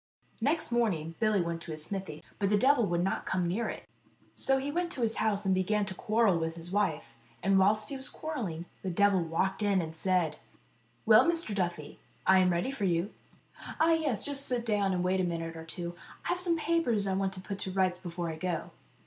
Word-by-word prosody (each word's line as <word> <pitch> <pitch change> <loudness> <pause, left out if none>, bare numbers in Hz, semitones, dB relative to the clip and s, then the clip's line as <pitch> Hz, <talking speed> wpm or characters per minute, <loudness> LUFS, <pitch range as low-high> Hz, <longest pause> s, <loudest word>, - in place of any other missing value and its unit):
Next 295 +3 0
morning 185 -10 0
Billy 215 -3 +3
went 170 -1 -3
to 170 - -7
his 155 0 -2
smithy, 190 -6 -5 0.2
but 200 -1 +1
the 210 - +4
devil 255 0 +4
would 175 0 0
not 190 - -2
come 180 -2 0
near 215 +6 -1
it. - - -7 0.5
So 270 - +1
he 275 +2 -2
went 345 +2 -1
to 250 - -2
his 225 -1 +1
house, 210 -2 0
and 190 - +3
began 200 +3 +1
to 190 - -5
quarrel 215 -3 +2
with 165 0 -2
his 170 +1 -9
wife, 195 -6 -1 0.3
and 195 +1 +4
whilst 210 +3 +3
he 275 - -4
was 265 - -3
quarrelling 215 - -4 0.2
the 190 - -3
devil 195 +1 +3
walked 170 +5 -1
in 200 -2 +2
and 160 -2 -4
said: 175 -3 0 0.7
"Well, 220 +9 +7
Mr. 335 -10 +1
Duffy, 175 -6 -3 0.3
I 190 0 +6
am 185 -1 +4
ready 175 +9 0
for 240 -7 -2
you." 175 +2 0 0.3
" - - -12
Ah, 325 +1 +4
yes; 295 -10 0
just 280 -1 +2
sit 245 -2 0
down 205 -3 +1
and 180 -1 0
wait 185 +1 +1
a - - 0
minute 165 -1 -3
or 160 0 -8
two. 170 +1 -6 0.3
I - - -2
have 355 - 0
some 345 -2 +1
papers 310 -11 +1
I 195 - 0
want 195 0 0
to 190 - -5
put 195 +1 -6
to 190 - -3
rights 185 -1 +1
before 175 -2 -4
I 160 - -7
go." 170 -1 -3
195 Hz, 225 wpm, -30 LUFS, 175-230 Hz, 0.7 s, Well